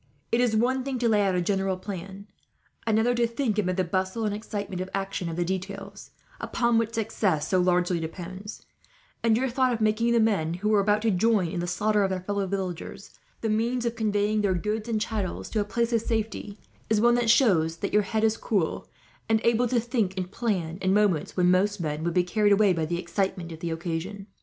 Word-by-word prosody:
It 235 - +3
is 240 -3 +2
one 255 +4 +1
thing 265 -1 -3
to 240 -1 +1
lay 215 -2 +3
out 195 -2 +1
a 180 - +1
general 195 0 0
plan; 195 +1 -7 0.6
another 220 +2 +3
to 235 -1 +2
think, 230 -2 -1
amid 185 -2 0
the 185 - +2
bustle 190 +5 -1
and 210 - 0
excitement 205 -3 -4
of 185 - -5
action, 195 -3 -3
of 165 - -4
the 175 0 0
details 195 +2 -5 0.3
upon 235 -1 +1
which 230 0 -2
success 205 -8 0
so 185 - +2
largely 180 -1 +2
depends; 185 +5 -7 0.6
and 225 -1 +3
your 265 +2 +1
thought 255 +1 +1
of 235 - -1
making 220 +2 +2
the 235 - +4
men, 195 -8 +1
who 205 +4 -1
were 215 -1 +4
about 205 +2 +2
to 225 - +3
join 200 -1 +2
in 180 - -3
the 175 - -2
slaughter 210 +4 +1
of 195 - +1
their 185 -1 -2
fellow 200 +1 -2
villagers, 190 +1 -5 0.3
the 225 - -1
means 235 +3 0
of 235 0 -1
conveying 210 -1 +1
their 195 -3 +1
goods 210 +5 -2
and 220 -2 0
chattels 210 -4 -3
to 220 - 0
a - - +2
place 235 +3 -1
of 230 - +3
safety, 220 -2 -3 0.3
is 220 -1 +3
one 240 +2 +5
that 240 -1 +1
shows 180 - +4
that 200 - -4
your 210 - +5
head 220 +2 -1
is 220 0 +2
cool, 195 -8 -1 0.4
and 220 0 +4
able 235 +1 +3
to 240 0 +2
think 225 -5 -1
and 185 0 -3
plan 185 -8 -2
in 190 +1 +2
moments 200 -7 +1
when 180 0 +4
most 200 +3 +2
men 155 -2 -3
would 170 0 -1
be 180 - +4
carried 205 +3 +2
away 200 -1 +5
by 165 -2 -1
the 170 +1 -1
excitement 180 -1 -2
of 160 - -8
the 170 - -3
occasion. 170 +4 -4
205 Hz, 225 wpm, -26 LUFS, 185-225 Hz, 0.6 s, one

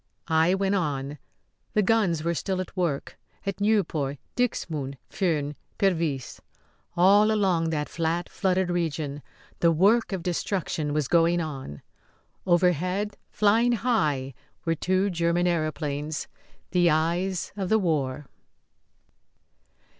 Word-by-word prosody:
I 160 +3 +4
went 195 0 0
on. 145 -6 -2 0.6
The 210 - +4
guns 190 -7 +2
were 170 +1 +1
still 185 +2 -2
at 185 - -5
work. 170 -7 -2 0.3
At 195 0 -3
Nieuport, 170 -10 +1 0.2
Dixmude, 155 - -2
Furnes, 150 -6 0 0.2
Pervyse 165 -9 0 0.6
all 200 +4 +6
along 185 -6 +2
that 150 -2 -1
flat, 170 +1 -1
flooded 185 -2 0
region 155 -4 -2 0.4
the 170 - +4
work 205 +9 +3
of 190 -3 -3
destruction 170 -4 -2
was 150 -2 0
going 170 +2 +3
on. 135 - -6 0.6
Overhead, 180 +3 +2
flying 225 +4 +3
high, 155 - 0 0.3
were 165 - +2
two 185 +4 +1
German 170 0 +1
aëroplanes 155 -3 -1 0.5
the 175 -2 +4
eyes 170 +4 0
of 195 -3 -3
the 220 - +5
war. 150 -7 -1
170 Hz, 115 wpm, -26 LUFS, 155-190 Hz, 0.6 s, all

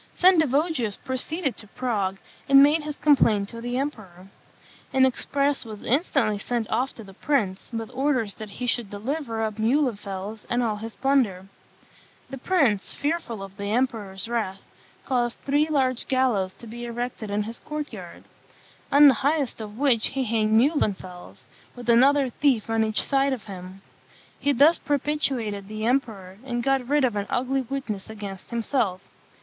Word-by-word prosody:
Sendivogius 315 - +3
proceeded 270 +3 -2
to 210 - -10
Prague, 200 -5 -2 0.3
and 275 0 +9
made 300 +3 +4
his 300 -1 -5
complaint 225 -10 +3
to 230 -1 -8
the 245 +1 -3
emperor. 195 -10 -5 0.6
An 265 0 +5
express 280 +2 0
was 215 -3 -9
instantly 255 - +1
sent 235 +1 -2
off 260 +2 +1
to 225 - -9
the 195 -1 -13
prince, 200 -6 -1
with 225 0 -5
orders 255 -6 0
that 215 -1 -9
he 250 +5 -6
should 240 -3 0
deliver 225 +2 -3
up 215 -1 -3
Muhlenfels 215 -5 -1
and 240 +1 +1
all 215 -3 -1
his 225 +1 -7
plunder. 250 -9 +1 0.9
The 270 - -6
prince, 270 - +1
fearful 285 -9 -3
of 195 0 -11
the 200 0 -4
emperor's 220 -5 -1
wrath, 215 -5 -2 0.4
caused 240 -2 0
three 290 +2 +2
large 260 -4 0
gallows 240 -8 +1
to - - -13
be 240 +2 -7
erected 240 -2 -4
in 205 +1 0
his 225 +2 -7
court 300 -1 -5
yard; - - -10 0.7
on 290 +1 +8
the 275 - +7
highest 285 -4 0
of 210 0 -8
which 255 -5 +3
he 270 0 -2
hanged 220 -2 +2
Muhlenfels, 200 - -1 0.3
with 245 -1 -10
another 270 +3 +5
thief 240 -5 +1
on 225 0 +2
each 215 -1 0
side 275 0 +2
of 240 -6 -5
him. 190 -1 -10 0.6
He 285 - +2
thus 290 +6 +5
propitiated 265 -8 -1
the 215 +1 -4
emperor, 215 -7 -1
and 240 -2 -3
got 270 -2 +1
rid 290 0 +3
of 240 -4 -1
an 200 -1 -2
ugly 265 +2 0
witness 240 -7 -5
against 200 -3 -8
himself. 230 -5 -1
240 Hz, 165 wpm, -25 LUFS, 210-275 Hz, 0.9 s, and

